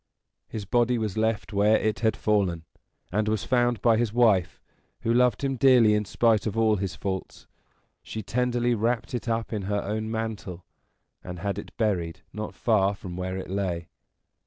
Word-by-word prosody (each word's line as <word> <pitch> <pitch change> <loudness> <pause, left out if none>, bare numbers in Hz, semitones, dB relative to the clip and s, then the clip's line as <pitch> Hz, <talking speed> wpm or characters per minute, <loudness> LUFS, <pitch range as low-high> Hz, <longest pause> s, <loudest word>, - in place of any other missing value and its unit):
His 105 -3 -6
body 120 +3 +2
was 110 -4 -2
left 110 0 -1
where 105 +2 +4
it 110 -2 -1
had 110 0 +1
fallen, 95 -6 0 0.5
and 105 +3 0
was 110 -1 0
found 120 -4 +1
by 115 -2 +5
his 115 -2 0
wife, 110 -7 +3 0.4
who 115 - +1
loved 125 0 +3
him 135 -1 0
dearly 120 -4 +6
in 105 0 +1
spite 110 +1 +2
of 110 +1 -3
all 110 -1 +3
his 95 -1 -3
faults. 95 -1 -5 0.6
She 110 - -6
tenderly 120 +3 0
wrapped 115 +3 -1
it 120 -1 -3
up 115 0 -1
in 105 - -2
her 105 -1 0
own 110 +2 -3
mantle, 110 -6 -4 0.6
and 90 0 -7
had 100 +2 -3
it - - -11
buried 90 -7 -1
not 105 0 -5
far 100 -3 +2
from 90 -3 -8
where 95 +1 -3
it 95 - -6
lay. 90 -4 -2
110 Hz, 180 wpm, -26 LUFS, 100-115 Hz, 0.6 s, dearly